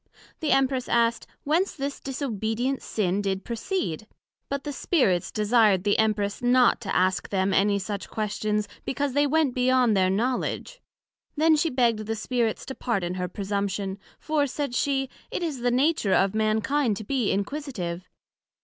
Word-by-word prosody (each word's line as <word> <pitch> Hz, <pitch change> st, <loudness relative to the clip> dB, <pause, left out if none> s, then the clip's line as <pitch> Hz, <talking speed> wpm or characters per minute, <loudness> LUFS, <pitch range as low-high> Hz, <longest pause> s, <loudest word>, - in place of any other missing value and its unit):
The 315 Hz, -, -2 dB
Empress 265 Hz, -2 st, +2 dB
asked, 235 Hz, -1 st, +2 dB, 0.2 s
Whence 335 Hz, +7 st, +1 dB
this 280 Hz, -1 st, -4 dB
disobedient 255 Hz, -1 st, -2 dB
sin 200 Hz, -2 st, -1 dB
did 195 Hz, -1 st, -2 dB
proceed? 230 Hz, -, -3 dB, 0.4 s
But 280 Hz, -1 st, -3 dB
the 295 Hz, -, -4 dB
Spirits 205 Hz, -, +1 dB
desired 210 Hz, -3 st, +3 dB
the 205 Hz, 0 st, +2 dB
Empress 210 Hz, -2 st, 0 dB
not 245 Hz, 0 st, +4 dB
to 195 Hz, -4 st, -3 dB
ask 185 Hz, -2 st, +1 dB
them 190 Hz, -1 st, +1 dB
any 200 Hz, +1 st, +3 dB
such 200 Hz, 0 st, -5 dB
questions, 210 Hz, -1 st, -1 dB, 0.2 s
because 280 Hz, 0 st, -2 dB
they 290 Hz, +1 st, +3 dB
went 300 Hz, -2 st, +2 dB
beyond 250 Hz, -3 st, +3 dB
their 185 Hz, -1 st, +3 dB
knowledg. 250 Hz, -, -1 dB, 0.6 s
Then 315 Hz, +1 st, +5 dB
she 325 Hz, +2 st, +1 dB
begg'd 235 Hz, -5 st, +1 dB
the 225 Hz, -, -1 dB
Spirits 230 Hz, 0 st, -1 dB
to 265 Hz, -, -5 dB
pardon 195 Hz, -10 st, -2 dB
her 180 Hz, 0 st, -2 dB
presumption; 200 Hz, 0 st, -3 dB, 0.2 s
for, 300 Hz, -2 st, 0 dB
said 280 Hz, -1 st, -3 dB
she, 270 Hz, +1 st, 0 dB, 0.2 s
It -, -, -3 dB
is 305 Hz, -6 st, -3 dB
the 245 Hz, +1 st, +1 dB
nature 255 Hz, -, +2 dB
of 195 Hz, 0 st, +2 dB
Mankind 220 Hz, +3 st, +1 dB
to 215 Hz, -, -6 dB
be 245 Hz, 0 st, 0 dB
inquisitive. 200 Hz, -, -3 dB
230 Hz, 160 wpm, -26 LUFS, 200-270 Hz, 0.6 s, Then